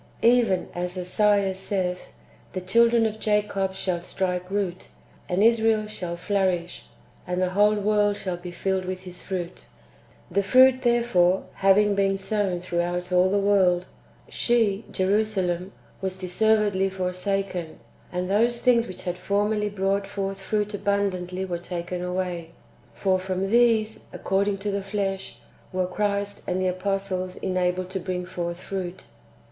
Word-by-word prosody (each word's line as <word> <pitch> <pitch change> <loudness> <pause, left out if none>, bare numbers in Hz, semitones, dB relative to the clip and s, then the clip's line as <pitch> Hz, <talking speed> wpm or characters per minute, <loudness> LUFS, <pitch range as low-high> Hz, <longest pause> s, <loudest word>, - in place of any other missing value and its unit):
Even 230 -6 +4
as 180 +1 -3
Esaias 195 +1 +2
saith, 185 -2 -2 0.3
" - - -29
The 185 - -3
children 230 +4 +4
of 220 0 -2
Jacob 205 -3 0
shall 180 -2 -2
strike 180 0 -2
root, 190 -3 -2 0.4
and 185 +3 +2
Israel 225 -1 +4
shall 180 -5 -5
flourish, 180 -2 -1 0.4
and 180 0 -1
the 185 0 +1
wdiole 205 +3 +3
world 205 -1 +2
shall 185 -2 -3
be 175 0 -8
filled 190 +2 -1
with 185 0 -4
his 180 -1 -10
fruit." 180 -2 -4
^ - - -19 0.7
The 200 - +3
fruit, 255 +5 +5
therefore, 235 -7 +3
having 200 +2 +4
been 195 -1 +2
sown 195 -3 -1
throughout 175 0 -2
all 180 +1 +4
the 200 - +2
world, 190 -3 +3 0.4
she 225 -3 +1
(Jerusalem) 190 -2 0 0.3
was 190 -1 -3
deservedly 195 +1 +2
forsaken, 185 -2 -3 0.3
and 180 0 -2
those 230 +5 +2
things 235 -2 +3
which 185 - -8
had 180 0 -3
formerly 210 +1 0
brought 195 0 0
forth 195 -1 -4
fruit 210 +1 -1
abundantly 190 -2 -1
were 175 -2 -3
taken 175 0 -5
away; 180 -2 -3 0.4
for 190 -1 +1
from 190 +1 -2
these, 225 -2 +3
according 195 +1 0
to 205 +1 -3
the 200 0 -1
flesh, 195 -1 -3 0.3
w^ere 185 -1 -1
Christ 205 0 -1
and 180 +1 0
the 185 - 0
apostles 185 0 -2
enabled 185 0 -1
to 190 - -2
bring 180 0 -3
forth 175 -1 -4
fruit. 185 -1 -5
190 Hz, 145 wpm, -25 LUFS, 180-205 Hz, 0.7 s, fruit